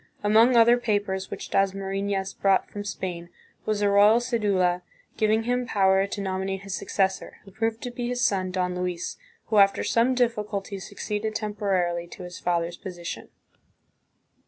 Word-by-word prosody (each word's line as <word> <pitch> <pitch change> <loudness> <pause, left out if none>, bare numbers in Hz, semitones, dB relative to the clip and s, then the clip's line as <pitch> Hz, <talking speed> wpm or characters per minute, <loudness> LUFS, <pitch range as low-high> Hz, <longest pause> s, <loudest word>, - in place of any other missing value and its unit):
Among 225 +4 +5
other 235 +1 +6
papers 205 -4 -1
which - - -7
Dasmarinas 195 0 -1
brought 195 -1 +2
from 205 - -5
Spain 175 -4 -5 0.4
was 210 -1 0
a 205 - +4
royal 205 +3 +6
cedula 200 -7 +1 0.3
giving 220 +1 +2
him 245 +1 -1
power 195 -1 +3
to 200 - -5
nominate 190 0 -2
his 195 -1 -6
successor, 190 +1 -1
who 195 - -14
proved 225 +3 -2
to 245 - -4
be 240 0 -4
his 245 0 0
son, 185 -2 +1
Don 180 -1 -1
Luis, 180 -1 -3 0.3
who 215 - +2
after 200 -1 +5
some 240 +3 +2
difficulty 210 -5 -1
succeeded 210 +3 -4
temporarily 195 -5 -1
to 180 - -10
his 180 0 -8
father's 170 0 -1
position. 175 -3 -7
200 Hz, 155 wpm, -25 LUFS, 190-220 Hz, 0.4 s, other